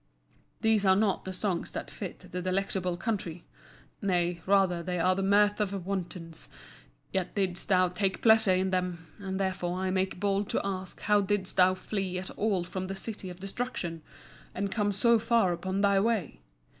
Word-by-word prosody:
These 220 Hz, -2 st, +3 dB
are 190 Hz, -1 st, +5 dB
not 205 Hz, -1 st, +1 dB
the 190 Hz, -, -3 dB
songs 185 Hz, -2 st, -2 dB
that -, -, -5 dB
fit -, -, -6 dB
the 180 Hz, -, -3 dB
Delectable 185 Hz, -1 st, -1 dB
Country; 180 Hz, -6 st, -3 dB, 0.6 s
nay, 175 Hz, -3 st, 0 dB
rather 190 Hz, -3 st, +3 dB
they 180 Hz, +1 st, -3 dB
are 185 Hz, +2 st, +3 dB
the 190 Hz, -, -2 dB
mirth 205 Hz, +2 st, +3 dB
of 195 Hz, -3 st, -2 dB
wantons. 175 Hz, -4 st, -5 dB, 0.6 s
Yet 190 Hz, -2 st, -2 dB
didst 185 Hz, -3 st, 0 dB
thou 185 Hz, -1 st, +5 dB
take 190 Hz, +1 st, -1 dB
pleasure 220 Hz, -4 st, +6 dB
in 190 Hz, +1 st, 0 dB
them; 180 Hz, -3 st, -1 dB
and 190 Hz, -1 st, -4 dB
therefore 185 Hz, -2 st, -1 dB
I 185 Hz, 0 st, -1 dB
make 190 Hz, -1 st, -1 dB
bold 200 Hz, 0 st, 0 dB
to -, -, +1 dB
ask 190 Hz, -1 st, -4 dB
how 210 Hz, 0 st, +3 dB
didst 195 Hz, -1 st, -1 dB
thou 185 Hz, 0 st, +6 dB
flee 190 Hz, -1 st, -3 dB
at 185 Hz, +1 st, -4 dB
all 200 Hz, -4 st, 0 dB
from 185 Hz, +1 st, -5 dB
the 195 Hz, -, -4 dB
City 205 Hz, -1 st, -6 dB
of 180 Hz, 0 st, -9 dB
Destruction, 195 Hz, -5 st, -4 dB, 0.5 s
and 200 Hz, +1 st, -2 dB
come 205 Hz, -1 st, +1 dB
so 230 Hz, +4 st, +4 dB
far 230 Hz, -5 st, +3 dB
upon 190 Hz, +3 st, -2 dB
thy 200 Hz, -1 st, +4 dB
way? 205 Hz, -, 0 dB
190 Hz, 180 wpm, -29 LUFS, 180-200 Hz, 0.6 s, pleasure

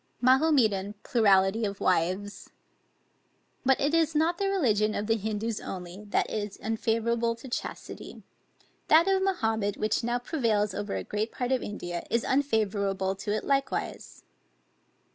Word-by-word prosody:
MAHOMETAN 245 Hz, -7 st, +3 dB
PLURALITY 205 Hz, -3 st, +3 dB
OF 200 Hz, -1 st, -2 dB
WIVES. 185 Hz, +3 st, 0 dB, 1.1 s
But 265 Hz, -1 st, +3 dB
it 285 Hz, +3 st, +1 dB
is 325 Hz, -2 st, +2 dB
not 330 Hz, +3 st, +2 dB
the 395 Hz, -1 st, +1 dB
religion 215 Hz, -, +2 dB
of 205 Hz, -, -2 dB
the 225 Hz, +1 st, +2 dB
Hindoos 220 Hz, +1 st, -3 dB
only, 180 Hz, +2 st, -7 dB
that 205 Hz, -, 0 dB
is 205 Hz, -2 st, -4 dB
unfavorable 230 Hz, +1 st, 0 dB
to 230 Hz, +3 st, -11 dB
chastity; 245 Hz, -, -6 dB, 0.6 s
that 320 Hz, +3 st, +6 dB
of 385 Hz, -1 st, +3 dB
Mahomet 225 Hz, -, 0 dB
which 215 Hz, +1 st, 0 dB
now 240 Hz, +1 st, 0 dB
prevails 225 Hz, -, 0 dB
over 205 Hz, +1 st, -3 dB
a -, -, -3 dB
great 215 Hz, +2 st, -3 dB
part 250 Hz, 0 st, -3 dB
of 260 Hz, -, +2 dB
India, 175 Hz, -4 st, -5 dB
is 235 Hz, -, +1 dB
unfavorable 205 Hz, -8 st, 0 dB
to 205 Hz, -, -4 dB
it 215 Hz, -, -1 dB
likewise. 275 Hz, -1 st, -2 dB
220 Hz, 145 wpm, -28 LUFS, 205-260 Hz, 1.1 s, that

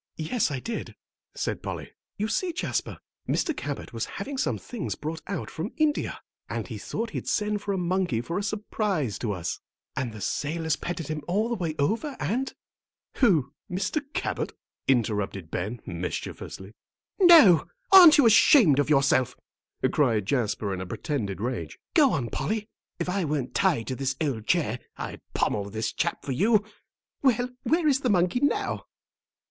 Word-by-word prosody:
"Yes, 165 Hz, +9 st, 0 dB
I 140 Hz, -3 st, -3 dB
did," 230 Hz, -, -5 dB, 0.4 s
said -, -, -2 dB
Polly. -, -, -6 dB, 0.3 s
"You 210 Hz, -, -1 dB
see, 340 Hz, +11 st, -1 dB
Jasper, -, -, -2 dB, 0.3 s
Mr. 320 Hz, -, +1 dB
Cabot 145 Hz, -, -5 dB
was 115 Hz, -, -2 dB
having 275 Hz, +9 st, -4 dB
some 265 Hz, -, 0 dB
things 245 Hz, -4 st, -5 dB
brought 160 Hz, +2 st, -5 dB
out 195 Hz, -5 st, -4 dB
from 165 Hz, +8 st, -5 dB
India, 310 Hz, -2 st, +1 dB, 0.3 s
and -, -, -3 dB
he -, -, -6 dB
thought 225 Hz, 0 st, -4 dB
he'd -, -, -5 dB
send 210 Hz, 0 st, 0 dB
for 205 Hz, -, -3 dB
a 195 Hz, -, 0 dB
monkey 180 Hz, -7 st, 0 dB
for 165 Hz, +10 st, -3 dB
a -, -, -3 dB
surprise 200 Hz, -, -1 dB
to 115 Hz, -, -1 dB
us. 90 Hz, -4 st, -3 dB, 0.4 s
And 130 Hz, -3 st, -2 dB
the 110 Hz, -, -9 dB
sailors 160 Hz, -, -1 dB
petted 170 Hz, -4 st, -4 dB
him 155 Hz, -1 st, -3 dB
all 210 Hz, +6 st, +1 dB
the -, -, 0 dB
way 165 Hz, -6 st, -3 dB
over, 230 Hz, -, 0 dB
and 260 Hz, +6 st, -1 dB, 0.3 s
" -, -, -67 dB
"Who, 160 Hz, -, +3 dB, 0.2 s
Mr. 190 Hz, -, -1 dB
Cabot?" -, -, -2 dB, 0.3 s
interrupted 105 Hz, -8 st, 0 dB
Ben, 105 Hz, +7 st, -3 dB
mischievously. 90 Hz, +3 st, -5 dB, 0.5 s
"No; 320 Hz, -, +8 dB, 0.2 s
aren't 360 Hz, -5 st, +10 dB
you 285 Hz, -, +6 dB
ashamed 215 Hz, -, +7 dB
of 145 Hz, -, +1 dB
yourself," 135 Hz, -3 st, +3 dB, 0.6 s
cried 115 Hz, -9 st, +2 dB
Jasper, 105 Hz, -4 st, 0 dB
in 90 Hz, -, -4 dB
a 95 Hz, -, -5 dB
pretended 105 Hz, -, -3 dB
rage. 105 Hz, -9 st, -3 dB, 0.2 s
"Go 295 Hz, -7 st, +5 dB
on, 120 Hz, -5 st, -2 dB
Polly. 210 Hz, +9 st, -2 dB, 0.3 s
If -, -, -3 dB
I 190 Hz, +1 st, 0 dB
weren't 145 Hz, -5 st, -2 dB
tied 170 Hz, -, +2 dB
to 130 Hz, -, -3 dB
this 135 Hz, +1 st, -1 dB
old 130 Hz, -8 st, -2 dB
chair 135 Hz, -9 st, +1 dB, 0.2 s
I'd -, -, -6 dB
pommel 100 Hz, -1 st, 0 dB
this 110 Hz, +2 st, -2 dB
chap 170 Hz, +2 st, -2 dB
for 140 Hz, -, -3 dB
you. 210 Hz, -, +3 dB, 0.6 s
Well, 250 Hz, -2 st, +2 dB
where 325 Hz, 0 st, +2 dB
is 270 Hz, -3 st, +4 dB
the 255 Hz, -, 0 dB
monkey 180 Hz, +3 st, +2 dB
now?" 285 Hz, +2 st, 0 dB
165 Hz, 170 wpm, -27 LUFS, -, 0.6 s, aren't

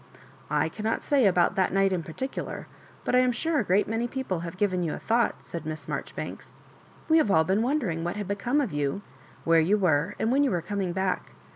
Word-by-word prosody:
"I 150 Hz, +1 st, +2 dB
cannot 215 Hz, +7 st, -2 dB
say 275 Hz, -7 st, +3 dB
about 180 Hz, -2 st, +3 dB
that 190 Hz, -1 st, +1 dB
night 195 Hz, 0 st, +2 dB
in 180 Hz, -, 0 dB
particular, 260 Hz, +12 st, -5 dB, 0.4 s
but -, -, -1 dB
I 250 Hz, -, +6 dB
am 255 Hz, 0 st, +3 dB
sure 310 Hz, +6 st, 0 dB
a -, -, +1 dB
great 195 Hz, +1 st, +2 dB
many 225 Hz, +3 st, -1 dB
people 245 Hz, -9 st, -3 dB
have 170 Hz, +2 st, -7 dB
given 185 Hz, -3 st, +1 dB
you 165 Hz, -3 st, -1 dB
a -, -, -6 dB
thought," 235 Hz, +1 st, 0 dB
said 170 Hz, -, -6 dB
Miss 155 Hz, -1 st, -5 dB
Marjoribanks. -, -, -6 dB, 0.3 s
" -, -, -26 dB
We 320 Hz, 0 st, +5 dB
have 265 Hz, -, +2 dB
all 160 Hz, -5 st, +5 dB
been 190 Hz, +6 st, +1 dB
wondering 230 Hz, -, 0 dB
what 175 Hz, +2 st, -2 dB
had 205 Hz, -2 st, -4 dB
become 235 Hz, +9 st, 0 dB
of 270 Hz, -, -3 dB
you, 145 Hz, +6 st, -1 dB, 0.4 s
where 165 Hz, 0 st, +4 dB
you 185 Hz, +7 st, +3 dB
were, 175 Hz, 0 st, +1 dB
and 225 Hz, -, 0 dB
when 280 Hz, +2 st, +4 dB
you 280 Hz, -, +2 dB
were 175 Hz, -6 st, -1 dB
com 205 Hz, +2 st, -3 dB
ing 180 Hz, -2 st, -2 dB
back. 190 Hz, 0 st, -2 dB
195 Hz, 235 wpm, -27 LUFS, 170-235 Hz, 0.4 s, I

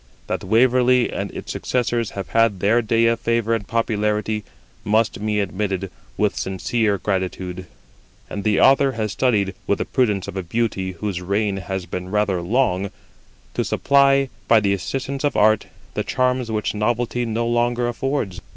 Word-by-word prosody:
That -, -, -3 dB
Waverly 125 Hz, +4 st, +3 dB
and -, -, -3 dB
its -, -, -7 dB
successors 120 Hz, -2 st, -1 dB
have 100 Hz, -, -4 dB
had 115 Hz, -4 st, +2 dB
their 110 Hz, +5 st, +3 dB
day 115 Hz, +1 st, +2 dB
of 115 Hz, 0 st, +2 dB
favour 115 Hz, -1 st, +1 dB
and 105 Hz, -4 st, -2 dB
popularity 105 Hz, -2 st, 0 dB, 0.4 s
must 110 Hz, 0 st, +1 dB
be 105 Hz, -1 st, 0 dB
admitted 95 Hz, -1 st, -2 dB, 0.3 s
with 105 Hz, -1 st, +1 dB
sincere 100 Hz, +2 st, 0 dB
gratitude; 95 Hz, -2 st, -3 dB, 0.6 s
and 100 Hz, -, -5 dB
the 105 Hz, -1 st, +2 dB
Author 135 Hz, 0 st, +5 dB
has 110 Hz, -3 st, -2 dB
studied 105 Hz, -6 st, +1 dB
(with 100 Hz, -, +2 dB
the -, -, -2 dB
prudence 105 Hz, -7 st, 0 dB
of -, -, -7 dB
a 95 Hz, -, -1 dB
beauty 95 Hz, 0 st, -2 dB
whose 90 Hz, 0 st, -4 dB
reign 100 Hz, +2 st, 0 dB
has 95 Hz, -1 st, -4 dB
been 90 Hz, +1 st, -5 dB
rather 105 Hz, -3 st, +1 dB
long) 100 Hz, -1 st, +1 dB, 0.6 s
to -, -, 0 dB
supply, 140 Hz, -1 st, +3 dB, 0.2 s
by 115 Hz, -, +6 dB
the 100 Hz, -2 st, +1 dB
assistance 135 Hz, +8 st, -3 dB
of 145 Hz, -, +1 dB
art, 110 Hz, 0 st, +3 dB, 0.3 s
the -, -, -1 dB
charms 125 Hz, -1 st, 0 dB
which 105 Hz, -2 st, -1 dB
novelty 120 Hz, +3 st, 0 dB
no 115 Hz, 0 st, -1 dB
longer 120 Hz, +1 st, +1 dB
affords. 120 Hz, -6 st, -2 dB
110 Hz, 160 wpm, -21 LUFS, 100-120 Hz, 0.6 s, by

